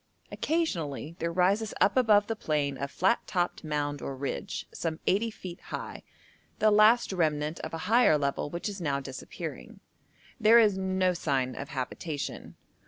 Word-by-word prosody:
Occasionally 170 - -2
there 170 0 -1
rises 195 +5 +1
up 200 - +4
above 215 -5 +5
the 225 - -3
plain 150 -7 -1
a 140 - -2
flat 190 +10 +2
topped 175 -2 -1
mound 145 -2 -2
or 135 - -4
ridge, 140 +8 -4
some 160 -1 -3
80 215 +5 +2
feet 185 -5 -9
high, - - -6 0.6
the 215 - +4
last 215 +1 +5
remnant 155 -3 0
of - - -6
a 165 - -6
higher 225 -6 +5
level 140 0 -1
which 170 +6 -4
is 200 -2 -5
now 140 -4 0
disappearing. 135 -1 -8 0.6
There 225 +1 +7
is 215 -4 +5
no 190 -1 +1
sign 130 -6 -1
of 140 - -6
habitation. 140 +3 -5
175 Hz, 160 wpm, -29 LUFS, 145-210 Hz, 0.6 s, There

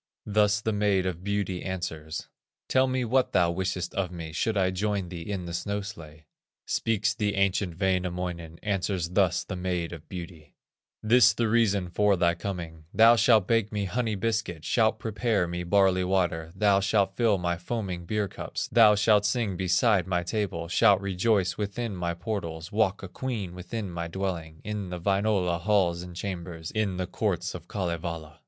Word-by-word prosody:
Thus 105 0 +2
the 110 0 -1
Maid 100 -2 +2
of 90 -1 -3
Beauty 100 -3 -2
answers: 80 -4 -5 0.4
"Tell 130 0 +3
me 130 -1 0
what 130 +2 +1
thou 85 -2 +3
wishest 90 0 -2
of 100 -2 -1
me, 85 -3 -7
Should 110 +5 0
I 95 -1 +2
join 100 -1 -1
thee 85 -2 -6
in 95 -3 -3
the 85 - -6
snow 100 +4 -2
sledge." 80 -6 -10 0.4
Speaks 110 -1 0
the 105 -2 -1
ancient 95 -3 0
Wainamoinen, 90 -3 -2
Answers 95 -4 -1
thus 90 -2 +2
the - - -6
Maid 90 -2 -2
of 80 -2 -11
Beauty: 85 -4 -9 0.5
"This 120 +1 +6
the 115 +1 0
reason 105 -5 +2
for 105 +1 +3
thy 85 -1 +3
coming: 85 -3 -6
Thou 115 +1 +7
shalt 110 -4 +4
bake 115 -2 +2
me 105 -2 -1
honey 110 +2 -1
biscuit, 100 -6 -2
Shalt 110 0 +2
prepare 110 -4 0
me 90 +1 -4
barley 95 0 +3
water, 85 -3 0
Thou 100 -1 +4
shalt 100 -1 +1
fill 115 -4 +3
my 85 -1 -1
foaming 90 -1 -4
beer 105 0 0
cups, - - -5
Thou 110 -3 +6
shalt 105 0 +4
sing 105 -2 0
beside 95 +1 +2
my 90 -2 0
table, 90 -3 -2
Shalt 100 +2 +4
rejoice 100 +1 0
within 105 +1 -3
my 85 -1 -2
portals, 85 -4 -5
Walk 105 -2 +1
a - - -5
queen 105 -4 -4
within 95 +2 -5
my 85 0 -4
dwelling, 85 -3 -4
In 105 -3 -4
the 90 0 -5
Wainola 95 -2 +1
halls 90 -3 +2
and 90 -1 -9
chambers, 85 -3 -5
In 105 -4 -1
the 90 - -1
courts 90 -2 -2
of 90 - -9
Kalevala." 85 -4 -4
95 Hz, 175 wpm, -27 LUFS, 85-105 Hz, 0.5 s, Thou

